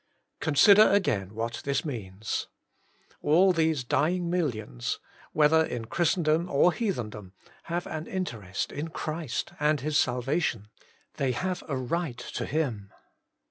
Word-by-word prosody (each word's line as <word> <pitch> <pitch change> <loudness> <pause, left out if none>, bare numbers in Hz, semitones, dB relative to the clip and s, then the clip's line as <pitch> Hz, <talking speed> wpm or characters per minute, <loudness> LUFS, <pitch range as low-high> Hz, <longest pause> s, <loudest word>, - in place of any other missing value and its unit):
Consider 200 +8 +6
again 115 - +1
what 115 +1 -3
this 140 +1 -1
means. 110 -6 -4 0.7
All 180 +5 +5
these 160 -5 +1
dying 170 +7 +1
millions, 110 - -2 0.3
whether 155 +1 +4
in 120 -7 -4
Christen 170 - +1
dom 160 +3 +2
or 160 +5 +4
heathendom, 105 - -3 0.3
have 170 +1 -2
an 155 0 -5
interest 115 - -3
in 150 +3 -4
Christ 155 -4 -4
and 150 -1 +2
His 150 +2 +1
salvation. 125 - 0 0.5
They 130 -2 +1
have 185 +7 -2
a 140 -4 -2
right 130 +1 -2
to - - -5
Him. 125 -10 -2
150 Hz, 130 wpm, -28 LUFS, 120-170 Hz, 0.7 s, Consider